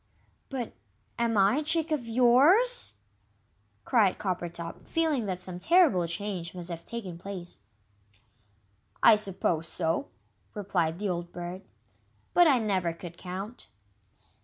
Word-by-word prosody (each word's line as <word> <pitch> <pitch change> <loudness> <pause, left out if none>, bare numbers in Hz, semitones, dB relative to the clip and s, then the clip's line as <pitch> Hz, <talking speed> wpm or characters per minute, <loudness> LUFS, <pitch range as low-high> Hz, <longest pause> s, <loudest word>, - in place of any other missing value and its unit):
"But 255 -4 -4 0.5
am 230 -2 +1
I 200 +6 +4
a 305 - 0
chick 320 +1 +3
of 275 -6 -1
yours?" 275 - +4 0.9
cried 215 -7 +3
Coppertop, 170 -3 -4
feeling 310 -9 0
that 185 -2 -3
some 180 -1 -3
terrible 280 - +4
change 180 -1 -4
must 175 0 -3
have 165 0 -6
taken 195 -8 -5
place. 180 - -6 1.4
"I 225 - +9
suppose 180 -5 -1
so," 165 +11 -1 0.5
replied 180 -5 -1
the 205 +1 -2
old 175 -1 -3
Bird; 175 +1 -6 0.7
"but 350 -1 +6
I 275 -4 +5
never 190 -7 0
could 170 0 -10
count." 190 +6 -7
195 Hz, 125 wpm, -28 LUFS, 175-245 Hz, 1.4 s, I